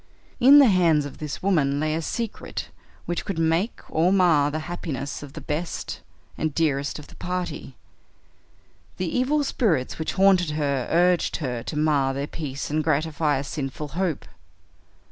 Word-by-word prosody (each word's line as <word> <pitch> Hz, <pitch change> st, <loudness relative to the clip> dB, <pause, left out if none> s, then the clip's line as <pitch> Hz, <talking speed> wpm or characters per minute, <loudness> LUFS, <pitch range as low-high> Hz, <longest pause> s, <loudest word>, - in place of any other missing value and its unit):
In 270 Hz, +3 st, +8 dB
the 285 Hz, -, +9 dB
hands 170 Hz, -, +4 dB
of 145 Hz, -, -9 dB
this 150 Hz, +2 st, -5 dB
woman 145 Hz, -8 st, +2 dB
lay 155 Hz, 0 st, 0 dB
a 160 Hz, -, -1 dB
secret 230 Hz, +6 st, -4 dB, 0.4 s
which 175 Hz, -, -2 dB
could 195 Hz, -, -4 dB
make 165 Hz, +6 st, 0 dB
or 165 Hz, +3 st, +2 dB
mar 170 Hz, -7 st, +4 dB
the 155 Hz, +1 st, -3 dB
happiness 150 Hz, -5 st, -5 dB
of 145 Hz, -2 st, -10 dB
the -, -, -8 dB
best 160 Hz, +3 st, -4 dB, 0.4 s
and 155 Hz, -2 st, -1 dB
dearest 145 Hz, -3 st, 0 dB
of 150 Hz, -, -10 dB
the -, -, -16 dB
party. 175 Hz, -7 st, -4 dB, 1.2 s
The 180 Hz, -3 st, -2 dB
evil 280 Hz, +4 st, +2 dB
spirits 170 Hz, -, 0 dB
which 160 Hz, -, -2 dB
haunted 190 Hz, -3 st, +4 dB
her 140 Hz, -4 st, 0 dB
urged 175 Hz, +1 st, +3 dB
her 125 Hz, -6 st, -3 dB
to 150 Hz, -, -5 dB
mar 145 Hz, -3 st, +2 dB
their 140 Hz, +1 st, -2 dB
peace 145 Hz, -2 st, -5 dB
and 155 Hz, +1 st, +1 dB
gratify 155 Hz, -1 st, +1 dB
a 135 Hz, -, -3 dB
sinful 140 Hz, +1 st, -5 dB
hope. 175 Hz, -1 st, -2 dB
155 Hz, 165 wpm, -24 LUFS, 145-180 Hz, 1.2 s, the